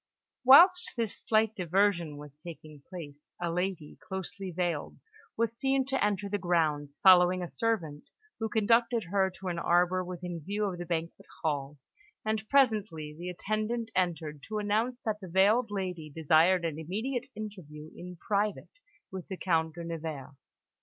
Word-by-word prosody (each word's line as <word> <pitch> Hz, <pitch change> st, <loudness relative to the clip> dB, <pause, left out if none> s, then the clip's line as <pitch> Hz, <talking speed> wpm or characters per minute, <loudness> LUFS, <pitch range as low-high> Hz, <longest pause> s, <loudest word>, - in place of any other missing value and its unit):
Whilst 355 Hz, +8 st, +7 dB
this 225 Hz, -3 st, -1 dB
slight 220 Hz, 0 st, +1 dB
diversion 180 Hz, -4 st, +1 dB
was 145 Hz, 0 st, -10 dB
taking 155 Hz, -4 st, -10 dB
place, 160 Hz, -6 st, -8 dB, 0.2 s
a 175 Hz, -1 st, -1 dB
lady, 180 Hz, -3 st, -3 dB
closely 190 Hz, 0 st, -6 dB
veiled, 175 Hz, -3 st, -2 dB, 0.4 s
was 230 Hz, 0 st, 0 dB
seen 270 Hz, +2 st, +1 dB
to 270 Hz, 0 st, 0 dB
enter 205 Hz, -1 st, 0 dB
the 205 Hz, +1 st, -2 dB
grounds, 155 Hz, -5 st, 0 dB
following 185 Hz, -1 st, +6 dB
a -, -, -4 dB
servant, 170 Hz, -10 st, -2 dB, 0.3 s
who 220 Hz, 0 st, -2 dB
conducted 230 Hz, +1 st, +2 dB
her 195 Hz, -1 st, +3 dB
to 190 Hz, 0 st, -9 dB
an 170 Hz, -1 st, -2 dB
arbour 180 Hz, +2 st, +2 dB
within 175 Hz, -2 st, -6 dB
view 205 Hz, +5 st, -1 dB
of 185 Hz, -3 st, -3 dB
the 175 Hz, -, -6 dB
banquet 170 Hz, -1 st, -4 dB, 0.2 s
hall; 145 Hz, -2 st, -2 dB, 0.5 s
and 215 Hz, -1 st, -2 dB
presently 210 Hz, -, +2 dB
the 175 Hz, +3 st, -6 dB
attendant 215 Hz, +5 st, -2 dB
entered 160 Hz, -5 st, -1 dB
to 215 Hz, -, -3 dB
announce 220 Hz, +4 st, 0 dB
that 215 Hz, -1 st, -1 dB
the 190 Hz, -, -8 dB
veiled 210 Hz, +6 st, +4 dB
lady 180 Hz, -6 st, -4 dB
desired 165 Hz, +4 st, +3 dB
an 160 Hz, -2 st, -3 dB
immediate 220 Hz, -, -3 dB
interview 170 Hz, -8 st, -8 dB
in 180 Hz, +1 st, -9 dB
private 210 Hz, -, -2 dB, 0.3 s
with 190 Hz, -2 st, -7 dB
the 190 Hz, -, -5 dB
Count 160 Hz, -3 st, 0 dB
de 170 Hz, -, -6 dB
Nevers. 160 Hz, -4 st, -6 dB
185 Hz, 155 wpm, -30 LUFS, 165-215 Hz, 0.5 s, Whilst